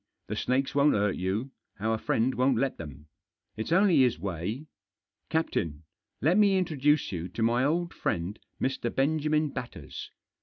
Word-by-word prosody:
The - - -2
snakes 135 +3 0
won't 145 +1 +4
hurt 105 -1 +1
you; 100 +9 -2 0.3
our 110 +1 0
friend 120 +4 +1
won't 130 -1 +2
let 135 +2 0
them. 75 -2 -9 0.5
It's 110 +7 -4
only 185 -1 +5
his 125 -3 +4
way. 100 - -4 0.6
Captain, 85 - -1 0.4
let 170 +9 +4
me 200 -2 +5
introduce 150 -5 +2
you 90 -2 -3
to 105 +5 -3
my 120 +2 +3
old 170 +4 0
friend, 90 +5 -2 0.2
Mr. 130 -2 -1
Benjamin 150 +2 +2
Batters. 120 - -7
130 Hz, 150 wpm, -28 LUFS, 100-150 Hz, 0.6 s, only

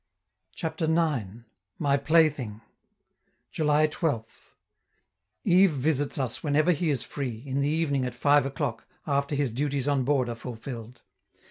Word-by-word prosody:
CHAPTER 160 0 -2
IX. 140 - 0 0.3
MY 140 -2 +2
PLAYTHING 140 -7 +2 0.9
July 150 0 +3
12th 145 -8 -4 0.9
Yves 185 -3 +5
visits 145 +1 0
us 130 -4 -2
whenever 155 +3 +2
he 165 0 0
is 135 -5 0
free, 125 -5 -5
in 135 0 -1
the 140 - +1
evening 150 -4 0
at 125 -1 -5
five 145 +1 +3
o'clock, 135 -3 -4 0.2
after 140 0 0
his 140 -4 0
duties 140 +2 -1
on 140 -2 +2
board 135 -1 +1
are 120 - -3
fulfilled. 115 0 -8
140 Hz, 135 wpm, -27 LUFS, 125-155 Hz, 0.9 s, Yves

